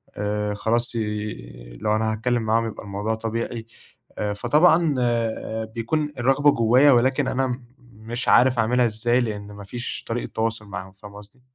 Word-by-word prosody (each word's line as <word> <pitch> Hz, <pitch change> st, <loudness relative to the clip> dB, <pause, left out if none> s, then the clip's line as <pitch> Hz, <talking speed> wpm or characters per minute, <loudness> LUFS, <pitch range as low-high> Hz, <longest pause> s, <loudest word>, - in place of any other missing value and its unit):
آآ 105 Hz, 0 st, -2 dB
خلاص 115 Hz, +3 st, 0 dB
ي 85 Hz, -, -5 dB
لو 105 Hz, 0 st, +1 dB
أنا 110 Hz, 0 st, 0 dB
هاتكلّم 120 Hz, +1 st, 0 dB
معاهم 115 Hz, +1 st, +1 dB
يبقى 110 Hz, -, -6 dB
الموضوع 105 Hz, +2 st, -2 dB
طبيعي، 115 Hz, +1 st, -4 dB, 0.5 s
آآ 105 Hz, -1 st, -1 dB
فطبعًا 150 Hz, -, +3 dB
آآ 115 Hz, -2 st, -1 dB
بيكون 135 Hz, +7 st, -2 dB
الرغبة 135 Hz, +4 st, +4 dB
جوّايا 125 Hz, +5 st, +5 dB
ولكن 130 Hz, +1 st, +3 dB
أنا 130 Hz, -1 st, -1 dB, 0.3 s
مش 115 Hz, +3 st, -6 dB
عارف 125 Hz, -1 st, +5 dB
أعملها 120 Hz, +2 st, +3 dB
إزاي 120 Hz, +3 st, +1 dB
لأن 105 Hz, -3 st, -4 dB
ما 100 Hz, 0 st, -10 dB
فيش 120 Hz, +5 st, -5 dB
طريقة 115 Hz, +1 st, -3 dB
تواصُل 110 Hz, -1 st, -1 dB
معاهم، 95 Hz, -2 st, -8 dB
فاهمة 100 Hz, +1 st, -13 dB
قصدي؟ 105 Hz, +6 st, -14 dB
115 Hz, 155 wpm, -23 LUFS, 105-120 Hz, 0.5 s, جوّايا